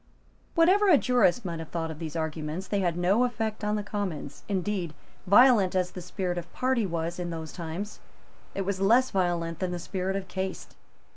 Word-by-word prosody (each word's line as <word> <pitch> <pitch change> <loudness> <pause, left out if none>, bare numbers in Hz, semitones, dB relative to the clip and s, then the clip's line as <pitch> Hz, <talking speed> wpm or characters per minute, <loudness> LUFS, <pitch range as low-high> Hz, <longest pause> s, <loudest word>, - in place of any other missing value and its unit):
Whatever 375 +5 +5
a 320 - +8
jurist 245 -4 +2
might 170 -2 -3
have 160 - -7
thought 165 -1 -3
of 155 - -9
these 160 -1 -5
arguments, 160 +2 -3
they 205 - 0
had 175 -3 0
no 190 +7 +3
effect 225 -3 -2
on 210 0 +1
the 210 - -2
Commons. 190 -9 -4
Indeed, 190 -4 -2 0.3
violent 205 -2 +6
as 180 -1 +1
the 180 - -7
spirit 180 0 -3
of 170 - -11
party 255 -5 +1
was 170 0 -3
in 175 -1 -3
those 160 -2 -6
times, 175 +4 -5 0.6
it 195 - -1
was 195 0 -2
less 240 +6 +4
violent 175 -3 0
than 185 - -1
the 180 - -3
spirit 190 +2 -3
of 195 -1 -3
caste. 190 +1 -5
185 Hz, 195 wpm, -28 LUFS, 170-210 Hz, 0.6 s, a